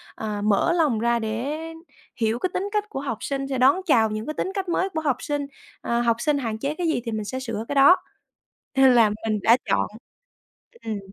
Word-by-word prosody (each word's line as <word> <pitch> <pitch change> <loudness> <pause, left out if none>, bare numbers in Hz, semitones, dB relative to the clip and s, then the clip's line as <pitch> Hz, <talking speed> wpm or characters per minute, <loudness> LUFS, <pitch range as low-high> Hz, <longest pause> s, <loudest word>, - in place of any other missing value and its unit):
à, 210 -2 -4
mở 215 +11 +2
lòng 300 -10 +2
ra 235 +1 +1
để 230 +7 -3 0.6
hiểu 225 0 0
cái 370 - -1
tính 390 +3 -2
cách 420 0 -1
của 270 - -5
học 250 -6 -3
sinh, 275 -1 -3
sẽ 270 -1 -2
đón 275 +9 +4
chào 225 - +4
những 215 +1 -4
cái 305 - -4
tính 375 - -3
cách 390 -3 -3
mới 375 +3 0
của 315 -3 -3
học 280 -5 +1
sinh. 290 -1 -2 0.4
Ờ, 235 0 0
học 230 -1 +2
sinh 295 +2 +1
hạn 225 -5 -3
chế 280 +4 -2
cái 350 -2 -1
gì 315 -6 0
thì 230 - -3
mình 215 -1 -3
sẽ 260 +5 -4
sửa 230 -4 -4
cái 285 - -3
đó, 280 +6 +8 0.8
nên 265 -1 +6
là 225 -3 +5 0.2
mình 215 -1 +1
đã 230 +2 +6
chọn - - +2 1.0
ừm. 215 -2 -3
260 Hz, 225 wpm, -24 LUFS, 225-305 Hz, 1.0 s, đó